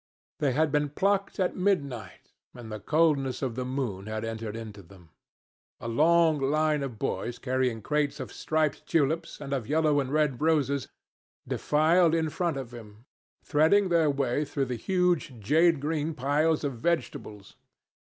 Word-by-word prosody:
They 140 Hz, -3 st, +1 dB
had 155 Hz, +2 st, +1 dB
been 150 Hz, 0 st, +1 dB
plucked 195 Hz, +7 st, 0 dB
at 185 Hz, -, 0 dB
midnight, 140 Hz, -, -2 dB, 0.2 s
and 120 Hz, -3 st, -9 dB
the 110 Hz, -, -5 dB
coldness 140 Hz, 0 st, +1 dB
of 130 Hz, -3 st, -1 dB
the 130 Hz, +2 st, -3 dB
moon 125 Hz, -7 st, -3 dB
had 110 Hz, +1 st, -3 dB
entered 115 Hz, -1 st, -5 dB
into 110 Hz, -3 st, -8 dB
them. 90 Hz, -2 st, -18 dB, 0.7 s
A -, -, -6 dB
long 160 Hz, +5 st, +3 dB
line 150 Hz, +2 st, +1 dB
of 130 Hz, -5 st, -5 dB
boys 115 Hz, +4 st, -3 dB
carrying 125 Hz, -4 st, -1 dB
crates 150 Hz, +1 st, 0 dB
of 130 Hz, -, -7 dB
striped 155 Hz, -1 st, -1 dB
tulips, 160 Hz, +1 st, 0 dB
and 140 Hz, -1 st, -5 dB
of 130 Hz, -5 st, -2 dB
yellow 150 Hz, 0 st, +2 dB
and 135 Hz, -1 st, -2 dB
red 150 Hz, -4 st, +1 dB
roses, 140 Hz, -4 st, +1 dB, 0.6 s
defiled 165 Hz, +3 st, +3 dB
in 160 Hz, -2 st, 0 dB
front 170 Hz, -4 st, -1 dB
of 130 Hz, -3 st, -7 dB
him, 110 Hz, -1 st, -12 dB, 0.4 s
threading 165 Hz, +6 st, +3 dB
their 165 Hz, -3 st, +3 dB
way 140 Hz, 0 st, 0 dB
through 140 Hz, -1 st, -2 dB
the 125 Hz, -1 st, -3 dB
huge, 175 Hz, -, 0 dB
jade 160 Hz, +8 st, +3 dB
green 155 Hz, +2 st, -2 dB
piles 150 Hz, +4 st, +1 dB
of 135 Hz, -5 st, -3 dB
vegetables. 115 Hz, -9 st, -3 dB
145 Hz, 160 wpm, -28 LUFS, 120-160 Hz, 0.7 s, long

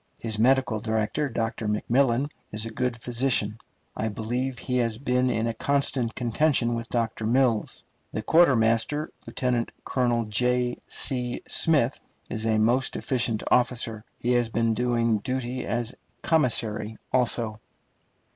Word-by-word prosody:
His 110 Hz, -2 st, -2 dB
medical 125 Hz, -2 st, +3 dB
director, 110 Hz, +6 st, -1 dB
Dr. 115 Hz, -1 st, -2 dB
McMillan, 120 Hz, +5 st, +1 dB, 0.2 s
is 110 Hz, +1 st, -4 dB
a 115 Hz, -, -5 dB
good 125 Hz, +1 st, -1 dB
physician, 115 Hz, -3 st, 0 dB, 0.4 s
I 110 Hz, -, -1 dB
believe; 120 Hz, +4 st, -2 dB
he 125 Hz, -1 st, -2 dB
has 115 Hz, -3 st, 0 dB
been 125 Hz, 0 st, +1 dB
in 115 Hz, -2 st, 0 dB
a 115 Hz, -, -1 dB
constant 135 Hz, -1 st, +1 dB
contention 120 Hz, 0 st, +1 dB
with 115 Hz, 0 st, -4 dB
Dr. 115 Hz, -2 st, -1 dB
Mills. 120 Hz, -2 st, +1 dB, 0.3 s
The 110 Hz, -, -4 dB
quartermaster, 130 Hz, -1 st, +3 dB, 0.2 s
Lieutenant 125 Hz, -2 st, -1 dB
Colonel 120 Hz, -3 st, +1 dB
J. 125 Hz, +3 st, +1 dB
C. 125 Hz, -2 st, -3 dB
Smith, 145 Hz, -5 st, +2 dB, 0.3 s
is 110 Hz, 0 st, -1 dB
a 110 Hz, -1 st, +2 dB
most 120 Hz, +5 st, +2 dB
efficient 115 Hz, -4 st, 0 dB
officer; 120 Hz, -3 st, +1 dB
he 120 Hz, -, -1 dB
has 120 Hz, -2 st, +2 dB
been 115 Hz, 0 st, +1 dB
doing 115 Hz, -2 st, +1 dB
duty 125 Hz, +2 st, -3 dB
as 120 Hz, +1 st, -2 dB, 0.3 s
commissary 110 Hz, -7 st, +1 dB, 0.2 s
also. 115 Hz, -3 st, +1 dB
120 Hz, 135 wpm, -26 LUFS, 110-125 Hz, 0.4 s, medical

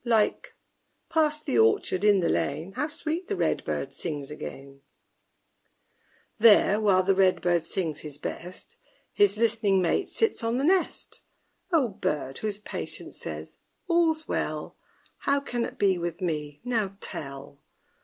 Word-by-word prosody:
Like 225 Hz, -3 st, +1 dB, 0.5 s
Past 305 Hz, -2 st, +1 dB
the 120 Hz, -, +1 dB
orchard, 115 Hz, -, +3 dB
in 205 Hz, -2 st, +5 dB
the 170 Hz, -, +1 dB
lane, 160 Hz, +6 st, -1 dB
How 290 Hz, +9 st, -1 dB
sweet 320 Hz, +3 st, -4 dB
the 410 Hz, -, -1 dB
red -, -, 0 dB
bird -, -, -3 dB
sings 150 Hz, -4 st, -5 dB
again! 140 Hz, -2 st, -8 dB, 1.6 s
There, 215 Hz, -1 st, +6 dB
while 190 Hz, -3 st, +4 dB
the 195 Hz, +1 st, +3 dB
red 190 Hz, -1 st, +3 dB
bird 175 Hz, -2 st, +1 dB
sings 165 Hz, -4 st, -2 dB
his 150 Hz, -3 st, -7 dB
best, 180 Hz, -, -7 dB, 0.4 s
His 410 Hz, -, +4 dB
listening 220 Hz, -4 st, +2 dB
mate 185 Hz, -, +1 dB
sits 445 Hz, -, +1 dB
on 230 Hz, +1 st, 0 dB
the 265 Hz, -, 0 dB
nest 365 Hz, +4 st, 0 dB, 0.5 s
O 310 Hz, -7 st, +4 dB
bird, 150 Hz, -, -3 dB
whose 210 Hz, -2 st, -3 dB
patience 210 Hz, -, -7 dB
says, -, -, -7 dB, 0.3 s
All's 325 Hz, -3 st, +2 dB
well, -, -, -3 dB, 0.4 s
How 280 Hz, 0 st, +2 dB
can 245 Hz, -4 st, -3 dB
it -, -, -8 dB
be 190 Hz, -3 st, +2 dB
with 170 Hz, -1 st, -3 dB
me, 150 Hz, -4 st, -3 dB
now 220 Hz, -6 st, -1 dB
tell? 140 Hz, -4 st, -7 dB
200 Hz, 145 wpm, -27 LUFS, -, 1.6 s, There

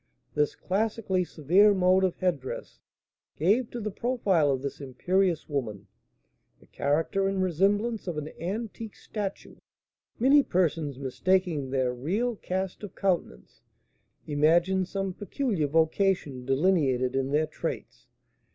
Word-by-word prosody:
This 150 Hz, -1 st, +1 dB
classically 200 Hz, -1 st, -1 dB
severe 180 Hz, +6 st, +4 dB
mode 185 Hz, 0 st, +4 dB
of 185 Hz, -2 st, +1 dB
head 180 Hz, -6 st, 0 dB
dress 130 Hz, -, -8 dB, 0.6 s
gave 215 Hz, -, +2 dB
to 240 Hz, -, -6 dB
the 215 Hz, -1 st, -3 dB
profile 195 Hz, -, +1 dB
of 135 Hz, -1 st, -1 dB
this 140 Hz, +1 st, -5 dB
imperious 175 Hz, +6 st, 0 dB
woman 120 Hz, -9 st, -4 dB, 0.7 s
the -, -, -21 dB
character 160 Hz, +7 st, 0 dB
and 195 Hz, 0 st, -1 dB
resemblance 200 Hz, +5 st, +1 dB
of 170 Hz, -3 st, -3 dB
an 150 Hz, 0 st, -4 dB
antique 215 Hz, +4 st, -5 dB
statue. 205 Hz, -3 st, -6 dB, 0.6 s
Many 275 Hz, +5 st, +6 dB
persons, 165 Hz, -, 0 dB
mistaking 155 Hz, +2 st, 0 dB
their 130 Hz, -2 st, 0 dB
real 200 Hz, -, -1 dB
cast 190 Hz, -1 st, -4 dB
of 205 Hz, -3 st, -9 dB
countenance, 175 Hz, -, -2 dB, 0.6 s
imagine 170 Hz, +6 st, +2 dB
some 195 Hz, 0 st, -3 dB
peculiar 205 Hz, -, -1 dB
vocation 160 Hz, -3 st, +1 dB
delineated 135 Hz, -4 st, +2 dB
in 135 Hz, 0 st, 0 dB
their 150 Hz, +2 st, +2 dB
traits. 155 Hz, -, -6 dB
180 Hz, 125 wpm, -27 LUFS, 145-195 Hz, 0.7 s, Many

